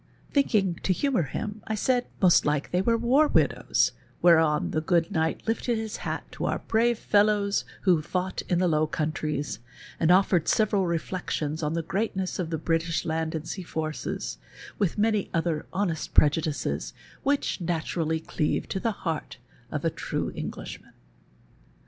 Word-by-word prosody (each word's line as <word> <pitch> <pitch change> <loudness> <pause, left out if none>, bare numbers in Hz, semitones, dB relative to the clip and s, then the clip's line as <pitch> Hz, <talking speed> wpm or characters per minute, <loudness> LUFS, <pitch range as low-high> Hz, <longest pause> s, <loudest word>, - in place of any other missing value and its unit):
Thinking 205 - +2
to 185 - +2
humour 270 0 +1
him, 205 - -4
I 220 - -1
said 245 +3 +1 0.2
most 180 -2 +6
like 150 -1 0
they 180 - +2
were 230 +4 +2
war 260 +7 +4
widows, - - +2 0.3
whereon 160 -3 +4
the 155 - 0
gofxl 165 0 +1
knight 160 0 0
lifted 230 +1 0
his 220 -1 -4
hat - - -3
to - - -4
our - - 0
brave 235 +1 +1
fellows 205 -1 +2 0.2
who 180 -5 +3
fought 185 +4 -2
in 175 - +2
the 180 +1 +3
Low 155 -1 +2
Countries, 150 -2 -2 0.4
and 165 - +2
offered 180 -2 +4
several 205 -3 +2
rellections 165 -2 -2
on 150 0 -1
the 165 - -1
greatness 190 +1 -2
o( 180 - 0
the 160 0 -3
liritish 165 +1 0
land 160 0 -1
and 160 +1 -4
sea 190 - -4
forces, 155 - -4 0.4
with 200 -3 +1
many 215 -1 +1
other 165 -2 -1
honest 175 -5 -2
prejudices 150 0 +2 0.3
which 280 -8 0
naturally 160 -1 -1
cleave 155 -1 -1
to 190 - -2
the 230 - 0
heart 160 -2 -3 0.3
of - - -3
a - - +2
true - - -3
Englishman. - - -7
175 Hz, 160 wpm, -27 LUFS, 160-205 Hz, 0.4 s, most